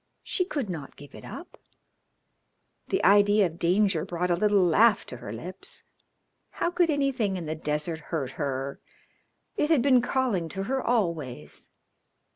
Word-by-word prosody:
She 365 Hz, -, 0 dB
could 285 Hz, -, -3 dB
not 160 Hz, -7 st, -6 dB
give 145 Hz, 0 st, -14 dB
it -, -, -11 dB
up. -, -, -10 dB, 1.3 s
The -, -, 0 dB
idea 205 Hz, +1 st, +5 dB
of 170 Hz, -1 st, -5 dB
danger 180 Hz, -1 st, +2 dB
brought 175 Hz, +1 st, -2 dB
a -, -, +4 dB
little 205 Hz, +1 st, +3 dB
laugh 210 Hz, +6 st, +4 dB
to 125 Hz, -, -8 dB
her 100 Hz, -, -8 dB
lips. 175 Hz, -, -7 dB, 0.7 s
How 345 Hz, -, -1 dB
could 350 Hz, -1 st, +2 dB
anything 270 Hz, -9 st, 0 dB
in 175 Hz, -, -5 dB
the 155 Hz, -, -2 dB
desert 155 Hz, +1 st, -2 dB
hurt 140 Hz, -6 st, -2 dB
her? 135 Hz, 0 st, -3 dB, 0.8 s
It 300 Hz, -, +1 dB
had 305 Hz, -7 st, +4 dB
been 260 Hz, -3 st, +5 dB
calling 245 Hz, -10 st, 0 dB
to 195 Hz, +2 st, -3 dB
her 265 Hz, +5 st, -1 dB
always. 165 Hz, -, -2 dB
185 Hz, 155 wpm, -27 LUFS, 160-235 Hz, 1.3 s, idea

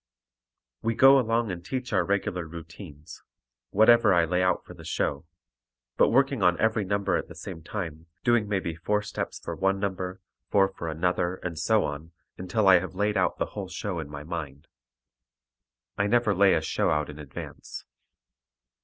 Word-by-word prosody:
We 115 Hz, 0 st, -1 dB
go 135 Hz, +2 st, +7 dB
along 115 Hz, -3 st, 0 dB
and 85 Hz, -1 st, -6 dB
teach 125 Hz, +4 st, -4 dB
our -, -, +3 dB
regular 100 Hz, -3 st, -1 dB
routines, 80 Hz, -2 st, -11 dB, 0.5 s
whatever 110 Hz, -1 st, +5 dB
I 85 Hz, -1 st, +4 dB
lay 90 Hz, +2 st, 0 dB
out 90 Hz, 0 st, +1 dB
for -, -, -11 dB
the -, -, -13 dB
show, 85 Hz, -, -2 dB, 0.7 s
but -, -, +4 dB
working 135 Hz, -1 st, +2 dB
on 90 Hz, -1 st, +3 dB
every 110 Hz, -1 st, +2 dB
number 100 Hz, 0 st, 0 dB
at -, -, -4 dB
the -, -, -12 dB
same 80 Hz, -, -8 dB
time, 80 Hz, -3 st, -6 dB, 0.2 s
doing 120 Hz, -3 st, +3 dB
maybe 95 Hz, -5 st, -1 dB
four 105 Hz, +6 st, -1 dB
steps -, -, -5 dB
for -, -, -6 dB
one 95 Hz, 0 st, +1 dB
number, 95 Hz, -2 st, -3 dB, 0.3 s
four 95 Hz, -1 st, +4 dB
for 85 Hz, -, -6 dB
another, 90 Hz, +2 st, 0 dB
and 85 Hz, -3 st, -4 dB
so 110 Hz, +6 st, +3 dB
on, 75 Hz, +3 st, -6 dB, 0.2 s
until 95 Hz, +3 st, 0 dB
I 95 Hz, -2 st, +8 dB
have 95 Hz, +1 st, -7 dB
laid 105 Hz, +2 st, 0 dB
out 90 Hz, -2 st, +1 dB
the -, -, -3 dB
whole 100 Hz, -3 st, -5 dB
show 95 Hz, -1 st, -4 dB
in 75 Hz, -3 st, -6 dB
my 75 Hz, 0 st, -7 dB
mind. 75 Hz, -3 st, -6 dB, 1.3 s
I 100 Hz, -, +2 dB
never 120 Hz, -1 st, +3 dB
lay 100 Hz, 0 st, +5 dB
a 80 Hz, -, +1 dB
show 80 Hz, -, 0 dB
out 75 Hz, 0 st, +1 dB
in 75 Hz, 0 st, -10 dB
advance. 75 Hz, -2 st, -9 dB
95 Hz, 180 wpm, -27 LUFS, 85-105 Hz, 1.3 s, I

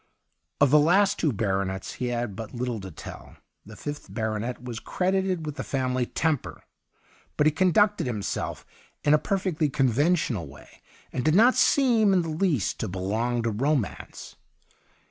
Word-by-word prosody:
Of 145 Hz, -2 st, +4 dB
the 150 Hz, -, +7 dB
last 195 Hz, +6 st, +3 dB
two 155 Hz, -, +2 dB
baronets 95 Hz, -3 st, -2 dB
he 125 Hz, -, -3 dB
had 120 Hz, -4 st, -2 dB
but 110 Hz, +2 st, -7 dB
little 120 Hz, -2 st, -2 dB
to 95 Hz, -1 st, -8 dB
tell. 80 Hz, -, -10 dB, 0.3 s
The 110 Hz, -, -11 dB
fifth 145 Hz, +4 st, -7 dB
baronet 110 Hz, +2 st, -3 dB
was 120 Hz, -3 st, -5 dB
credited 185 Hz, 0 st, -1 dB
with 150 Hz, -1 st, -5 dB
the 135 Hz, -, -3 dB
family 130 Hz, -2 st, -1 dB
temper, 160 Hz, -5 st, -2 dB, 0.7 s
but 150 Hz, -, +3 dB
he 155 Hz, -, +5 dB
conducted 195 Hz, +1 st, +2 dB
himself 110 Hz, -5 st, -3 dB, 0.4 s
in 145 Hz, -, +4 dB
a 150 Hz, -, +5 dB
per 195 Hz, +5 st, 0 dB
fectly 165 Hz, -6 st, -1 dB
conventional 135 Hz, -, +1 dB
way, 70 Hz, +1 st, -16 dB, 0.3 s
and 125 Hz, -, -2 dB
did 155 Hz, +1 st, +3 dB
not 235 Hz, +6 st, +6 dB
seem 230 Hz, -7 st, +4 dB
in 180 Hz, -2 st, +3 dB
the 165 Hz, -, -4 dB
least 155 Hz, -, 0 dB
to 110 Hz, -, -2 dB
belong 110 Hz, +6 st, -1 dB
to 115 Hz, -, 0 dB
romance. 130 Hz, -, -2 dB
135 Hz, 165 wpm, -26 LUFS, 115-170 Hz, 0.7 s, the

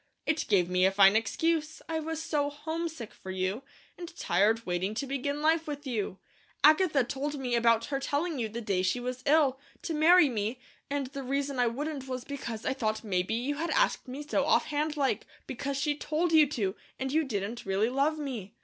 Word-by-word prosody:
"It 315 Hz, 0 st, 0 dB
gave 185 Hz, -5 st, +4 dB
me 180 Hz, 0 st, +1 dB
a 190 Hz, -, +5 dB
fine 195 Hz, +1 st, +6 dB
excuse. 315 Hz, +8 st, 0 dB
I 320 Hz, -1 st, -1 dB
was 320 Hz, 0 st, -4 dB
so 295 Hz, -2 st, 0 dB
homesick 315 Hz, -3 st, -5 dB
for 190 Hz, -, -11 dB
you, 185 Hz, +4 st, -2 dB, 0.4 s
and 350 Hz, 0 st, -7 dB
tired 225 Hz, +3 st, +2 dB
waiting 185 Hz, +4 st, -1 dB
to 280 Hz, -, -2 dB
begin 280 Hz, +2 st, -3 dB
life 320 Hz, +1 st, +2 dB
with 290 Hz, 0 st, -5 dB
you. 215 Hz, -7 st, -2 dB, 0.5 s
Agatha 310 Hz, -3 st, +5 dB
told 285 Hz, +4 st, -3 dB
me 250 Hz, -2 st, -2 dB
about 230 Hz, -1 st, +3 dB
her 275 Hz, -1 st, -2 dB
telling 290 Hz, +2 st, -1 dB
you 225 Hz, -2 st, -1 dB
the 235 Hz, +3 st, -5 dB
day 200 Hz, -4 st, 0 dB
she 185 Hz, +7 st, 0 dB
was 250 Hz, +1 st, -4 dB
ill, 280 Hz, -3 st, +4 dB, 0.2 s
to 330 Hz, -, -2 dB
marry 325 Hz, +2 st, +6 dB
me; 225 Hz, 0 st, -2 dB, 0.3 s
and 285 Hz, -1 st, -1 dB
the 275 Hz, -, -4 dB
reason 275 Hz, 0 st, -2 dB
I 245 Hz, -, +4 dB
wouldn't 275 Hz, +3 st, -3 dB
was 255 Hz, -1 st, -4 dB
because 235 Hz, -6 st, -6 dB
I -, -, +1 dB
thought 220 Hz, -4 st, -2 dB
maybe 185 Hz, 0 st, 0 dB
you 270 Hz, +5 st, -2 dB
asked 340 Hz, -, +1 dB
me 265 Hz, +4 st, -6 dB
so -, -, +1 dB
offhandlike, 295 Hz, -2 st, +1 dB, 0.2 s
because 275 Hz, +2 st, -3 dB
she 295 Hz, 0 st, +1 dB
TOLD 315 Hz, +3 st, -1 dB
you 310 Hz, -2 st, +6 dB
to, 210 Hz, -9 st, -2 dB, 0.2 s
and 265 Hz, 0 st, -3 dB
you 315 Hz, +2 st, +2 dB
didn't 215 Hz, -3 st, -4 dB
really 195 Hz, +4 st, +2 dB
love 285 Hz, +4 st, +1 dB
me. 255 Hz, -10 st, -5 dB
270 Hz, 195 wpm, -29 LUFS, 225-300 Hz, 0.5 s, fine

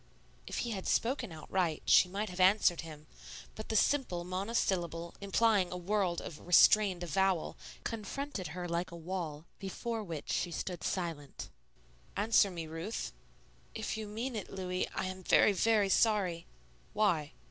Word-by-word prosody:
If -, -, -4 dB
he 235 Hz, -, -3 dB
had 195 Hz, -3 st, -4 dB
spoken 240 Hz, -3 st, 0 dB
outright, 160 Hz, 0 st, -1 dB
she 180 Hz, -, +6 dB
might 200 Hz, +1 st, -3 dB
have 180 Hz, -, -8 dB
answered 185 Hz, -2 st, +4 dB
him; 155 Hz, -2 st, -10 dB, 0.5 s
but 215 Hz, -, -8 dB
the 220 Hz, -, -1 dB
simple 215 Hz, -8 st, +2 dB
monosyllable, 180 Hz, -3 st, -1 dB
implying 200 Hz, -1 st, +2 dB
a 180 Hz, -, -3 dB
world 185 Hz, -1 st, 0 dB
of 150 Hz, -, -8 dB
restrained 185 Hz, 0 st, +6 dB
avowal, 185 Hz, +1 st, +1 dB, 0.3 s
confronted 225 Hz, 0 st, -4 dB
her 180 Hz, -1 st, -3 dB
like 170 Hz, +1 st, -1 dB
a 170 Hz, -, -9 dB
wall, 165 Hz, -3 st, -5 dB
before 225 Hz, +3 st, -4 dB
which 165 Hz, -6 st, -5 dB
she 175 Hz, -, 0 dB
stood 175 Hz, 0 st, -4 dB
silent. 165 Hz, -6 st, -4 dB, 0.7 s
"Answer 205 Hz, -1 st, +4 dB
me, 170 Hz, -3 st, -5 dB
Ruth." 165 Hz, +7 st, -5 dB, 0.6 s
"If 220 Hz, -1 st, -3 dB
you 220 Hz, -1 st, -5 dB
mean 230 Hz, +4 st, -4 dB
it, 210 Hz, -, -5 dB
Louis, 185 Hz, -1 st, -2 dB
I -, -, -1 dB
am 185 Hz, 0 st, -5 dB
very, 205 Hz, +3 st, +5 dB
very 210 Hz, 0 st, +3 dB
sorry." 190 Hz, -6 st, +2 dB, 0.5 s
"Why?" 180 Hz, -9 st, +1 dB
185 Hz, 150 wpm, -33 LUFS, 170-215 Hz, 0.7 s, she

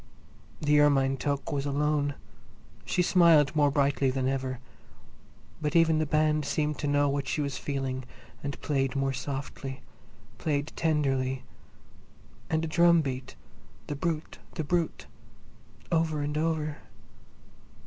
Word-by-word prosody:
The 150 Hz, 0 st, +3 dB
ermine 135 Hz, -2 st, +4 dB
toque 140 Hz, +1 st, -2 dB
was 140 Hz, 0 st, -1 dB
alone; 145 Hz, 0 st, 0 dB, 0.7 s
she 180 Hz, -, +1 dB
smiled 165 Hz, -5 st, +5 dB
more 145 Hz, -1 st, +4 dB
brightly 140 Hz, -1 st, +2 dB
than 130 Hz, 0 st, -1 dB
ever. 130 Hz, -1 st, -2 dB, 1.0 s
But 150 Hz, 0 st, -1 dB
even 165 Hz, -2 st, +5 dB
the 155 Hz, -, 0 dB
band 155 Hz, 0 st, +2 dB
seemed 150 Hz, 0 st, -1 dB
to 145 Hz, -, -2 dB
know 145 Hz, 0 st, +3 dB
what 140 Hz, 0 st, -1 dB
she -, -, -1 dB
was 140 Hz, -2 st, -2 dB
feeling 135 Hz, -2 st, -3 dB, 0.4 s
and 140 Hz, -1 st, -4 dB
played 135 Hz, -2 st, 0 dB
more 135 Hz, 0 st, 0 dB
softly, 135 Hz, 0 st, -5 dB, 0.6 s
played 145 Hz, -1 st, -1 dB
tenderly, 135 Hz, -5 st, 0 dB, 1.1 s
and 160 Hz, 0 st, +1 dB
the -, -, -1 dB
drum 170 Hz, +1 st, +5 dB
beat, 130 Hz, -2 st, -5 dB, 0.5 s
"The 145 Hz, -, -4 dB
Brute! 160 Hz, +1 st, -3 dB, 0.2 s
The 160 Hz, -, -2 dB
Brute!" 170 Hz, +2 st, -1 dB, 0.9 s
over 160 Hz, -3 st, +1 dB
and 145 Hz, +1 st, -3 dB
over. 155 Hz, -1 st, -1 dB
145 Hz, 130 wpm, -28 LUFS, 135-155 Hz, 1.1 s, smiled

